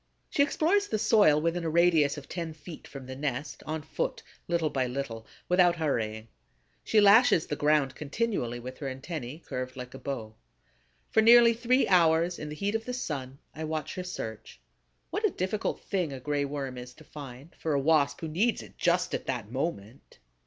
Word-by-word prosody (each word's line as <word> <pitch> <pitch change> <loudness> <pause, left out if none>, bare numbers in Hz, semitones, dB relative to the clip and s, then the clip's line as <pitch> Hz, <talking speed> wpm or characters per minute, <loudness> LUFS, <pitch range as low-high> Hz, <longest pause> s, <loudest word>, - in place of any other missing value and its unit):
She - - +2
explores 345 +8 +2
the 215 - -1
soil 210 -8 +5
within 165 +2 -1
a 165 - -1
radius 160 -3 +3
of 140 - -9
ten 165 -3 -5
feet 160 +1 -11
from 135 -2 -9
the 130 0 -7
nest, 140 0 -4
on 155 0 -3
foot, - - -3 0.2
little 170 -3 0
by 130 -2 0
little, 125 -3 -5 0.2
without 180 -1 +4
hurrying; 115 -9 -2 0.6
she 220 - +3
lashes 205 -3 +6
the 150 - -3
ground 145 -2 +2
continually 150 - -2
with 130 +2 -8
her 140 - -4
antennæ 135 +2 -6
curved 130 +1 -5
like 125 0 -7
a 135 - -9
bow. 115 -6 -5 0.8
For 220 - +5
nearly 235 +1 +8
three 245 +3 +2
hours, 170 -1 +3
in 150 - -5
the 150 - -6
heat 200 +6 -1
of 225 0 -2
the 250 - -3
sun, 135 - -4 0.2
I 160 - -6
watch 155 -1 -3
her 185 - -4
search. 110 - -7 0.5
What 420 - -2
a 425 - +4
difficult 205 - -2
thing 180 -7 -2
a 135 - -6
Gray 145 +2 -1
Worm 135 -3 -4
is 125 0 -10
to 155 - -15
find, 140 0 -10
for 160 - -1
a 140 - +2
Wasp 145 -1 +2
who 165 - -3
needs 200 +9 0
it - - -16
just 180 0 +2
at - - -3
that 120 -5 -3
moment! 130 -4 -5
155 Hz, 195 wpm, -29 LUFS, 135-180 Hz, 0.8 s, nearly